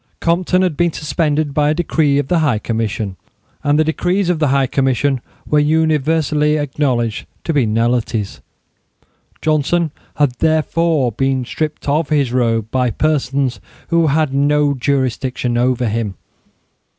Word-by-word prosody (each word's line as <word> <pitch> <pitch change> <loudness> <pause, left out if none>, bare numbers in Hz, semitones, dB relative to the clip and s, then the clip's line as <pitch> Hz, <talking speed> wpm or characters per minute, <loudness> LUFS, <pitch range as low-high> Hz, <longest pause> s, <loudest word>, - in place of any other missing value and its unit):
Compton 180 +2 +1
had 180 -5 0
been 170 +2 +1
suspended 150 -1 -1
by 150 0 +2
a 155 - +1
decree 155 -4 +1
of 145 -2 0
the 175 +1 +2
High 145 -8 +2
Commission, 110 -3 -3 0.5
and 145 0 +2
the 155 - +4
decrees 180 +4 0
of 170 - -2
the 155 - +2
High 135 0 +2
Commission 135 0 0 0.2
were 150 - +2
universally 155 0 +2
acknowledged 130 -6 -1 0.2
to 165 - -1
be 135 -6 +2
nullities. 115 -1 -1 1.0
Johnson 155 +2 +1 0.2
had 145 -3 +2
therefore 160 -3 +1
been 135 +2 -1
stripped 155 +4 -4
of 150 +2 +1
his 140 -5 +1
robe 115 -3 0
by 125 -1 +1
persons 135 -3 0 0.3
who 170 -1 +3
had 150 -1 +1
no 145 +1 +2
jurisdiction 130 -2 -1
over 125 0 +1
him. 110 -2 -2
145 Hz, 140 wpm, -17 LUFS, 125-155 Hz, 1.0 s, the